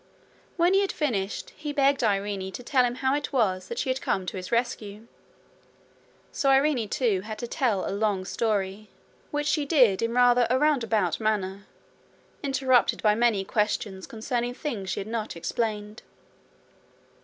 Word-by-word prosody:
When 350 +2 +4
he 390 - +5
had 395 - 0
finished, 210 -10 -2
he 300 -1 -6
begged 280 -2 +2
Irene 200 -2 -1
to 245 - -7
tell 255 0 +3
him 245 0 -2
how 265 +1 0
it 290 0 -2
was 190 -9 +1
that 235 - -6
she 260 - 0
had 255 - -3
come 190 - -1
to 180 - -5
his 185 -1 -6
rescue. 225 -3 -2 1.3
So 275 - 0
Irene 270 -5 +3
too 225 -9 +1
had 215 +2 -7
to 240 - -4
tell 230 -6 0
a - - -2
long 200 -2 0
story, 205 -1 -2 0.4
which 295 0 -2
she 300 0 +1
did 255 - +4
in 230 +1 -1
rather 245 -1 +5
a 255 - +3
roundabout 230 - +1
manner, 200 -2 -2 0.7
interrupted 265 -3 +2
by 210 -1 +5
many 220 -3 +2
questions 210 -2 -1
concerning 240 +2 -3
things 215 -11 -4
she - - -2
had - - -6
not 220 -3 -4
explained. 210 +4 -3
230 Hz, 165 wpm, -26 LUFS, 200-265 Hz, 1.3 s, he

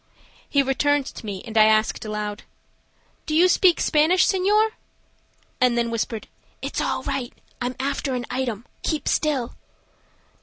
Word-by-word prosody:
He 280 -1 +3
returned 285 +1 +1
to - - -9
me 195 -2 -5
and 225 - -8
I 215 -1 +7
asked 215 0 +2
aloud: 210 0 -4 0.9
"Do 305 - -1
you 350 +3 +6
speak 360 -1 +4
Spanish, 320 +4 +3
senor?" 415 +3 +3 0.9
and 250 -1 +3
then 235 -1 0
whispered, 225 -1 -3 0.3
"It's - - -3
all - - -1
right. 270 -3 -3 0.3
I'm 250 +1 -2
after 275 0 -1
an 245 -1 -3
item. 240 -4 -3 0.2
Keep 310 -2 -2
still." 275 -6 0
260 Hz, 145 wpm, -23 LUFS, 230-305 Hz, 0.9 s, I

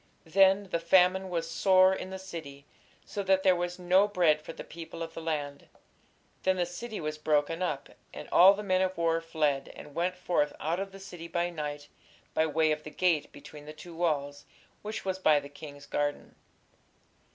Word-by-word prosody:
Then 195 +3 +4
"the 170 - +1
famine 185 +2 +3
was 165 -2 -2
sore 185 +2 +4
in 185 - -5
the 190 - -6
city, 160 -7 -9 0.4
so 205 - -4
that 190 -1 +2
there 185 -1 +5
was 175 0 -3
no 185 +3 +4
bread 170 -7 +2
for 160 - -8
the - - -9
people 165 0 -8
of 165 0 -8
the 165 - -7
land. 145 -3 -4 0.7
Then 190 0 +1
the 175 - +1
city 215 +6 -6
was 155 -1 -4
broken 155 +2 +1
up, 150 -7 -2 0.2
and - - -9
all 190 +3 +8
the 210 - -6
men 185 -2 +2
of 185 -1 -1
war 165 -1 +1
fled, 150 -4 -1
and 145 - -11
went 180 +3 -1
forth 175 -5 0
out 165 +3 -1
of 195 0 -4
the 195 - -11
city 175 -3 -9
by 175 0 -1
night 145 -2 -5 0.5
by 160 - +2
way 155 +1 +2
of 150 0 -1
the 155 - -9
gate 165 -2 +1
between 145 +1 -12
the 155 - -7
two 170 +2 -11
walls, 145 -4 -1 0.4
which 215 0 -6
was 190 -1 -2
by 155 -5 +4
the 140 0 -10
king's 145 -1 -11
garden." 145 0 -2
170 Hz, 195 wpm, -29 LUFS, 150-185 Hz, 0.7 s, all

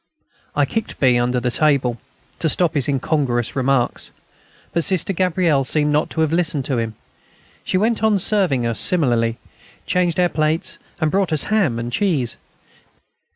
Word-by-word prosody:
I - - +3
kicked 225 -1 -4
B. 125 -3 +3
under 125 +1 0
the 125 0 -1
table, 135 -5 +1 0.4
to 160 - +1
stop 175 +2 +1
his 140 -4 +2
incongruous 130 -3 -1
remarks. 130 -2 0 0.6
But 170 - +1
Sister 190 +1 +1
Gabrielle 175 -5 +1
seemed 150 +2 0
not 150 - +1
to 160 - -2
have 160 0 +1
listened 160 -6 0
to 130 -4 -1
him. 115 -1 -4 0.7
She - - 0
went 220 +3 +1
on 220 -2 +3
serving 185 - +1
us 115 -1 -1
smilingly; 120 -9 +2 0.5
changed 180 -2 0
our 180 - +4
plates, 160 +3 -1 0.2
and 155 -2 0
brought 195 -3 0
us 155 -3 +3
ham 175 - +2
and 120 +1 -4
cheese. 150 - 0
155 Hz, 160 wpm, -20 LUFS, 125-180 Hz, 0.7 s, our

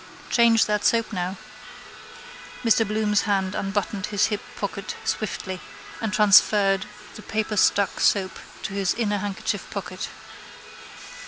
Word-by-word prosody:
Change 230 -2 +5
that 210 -1 -1
soap 230 -1 +2
now. 185 0 -3 1.3
Mr 225 -1 +4
Bloom's 210 0 +1
hand 190 -2 +1
unbuttoned 195 0 -2
his 205 -1 +2
hip 210 - -2
pocket 200 -1 -5
swiftly 185 -3 -3 0.4
and 220 -2 -1
transferred 200 -2 +5 0.3
the - - -10
paperstuck 210 -2 +1
soap 190 -2 +1 0.2
to - - -4
his 195 -2 0
inner 210 -3 0
handkerchief 200 0 -3
pocket. - - -5
205 Hz, 115 wpm, -24 LUFS, 195-215 Hz, 1.3 s, Change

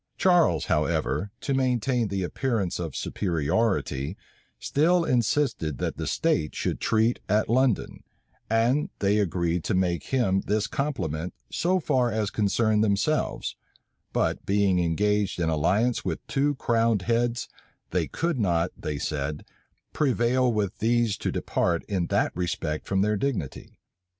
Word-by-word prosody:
Charles, 175 - +3
however, 80 +5 0
to 140 - -1
maintain 125 -2 +1
the 100 -1 -2
appearance 105 -2 -1
of 80 -5 -4
superiority, 85 - -1 0.4
still 170 +4 +2
insisted 120 - 0
that - - -3
the - - -3
states 75 - 0
should - - -2
treat 110 +2 +2
at 105 +2 +2
London; 125 0 +1 0.5
and 115 +6 +2
they 100 +1 +2
agreed 85 -3 0
to - - 0
make 90 -2 0
him 95 -8 +1
this 105 0 +1
compliment 90 - -3 0.2
so 185 +2 +1
far 125 -7 +1
as 110 -2 -1
concerned 110 +1 +2
themselves: 105 +9 0 0.6
but - - 0
being 100 -2 +2
engaged 100 +4 +1
in 85 -2 +1
alliance 100 +10 +1
with 90 -4 -4
two 145 +1 0
crowned 115 -5 +1
heads, 120 +2 0 0.4
they - - 0
could 165 -5 -2
not, 85 -4 +1
they 75 -1 -4
said, 75 0 -3 0.5
prevail 125 -2 +2
with 105 -4 -2
these 115 -1 +2
to - - -2
depart 85 -2 0
in 95 -5 -1
that - - 0
respect 85 -3 -3
from 95 0 +1
their 105 0 +1
dignity. 100 - -4
105 Hz, 135 wpm, -26 LUFS, 90-120 Hz, 0.6 s, Charles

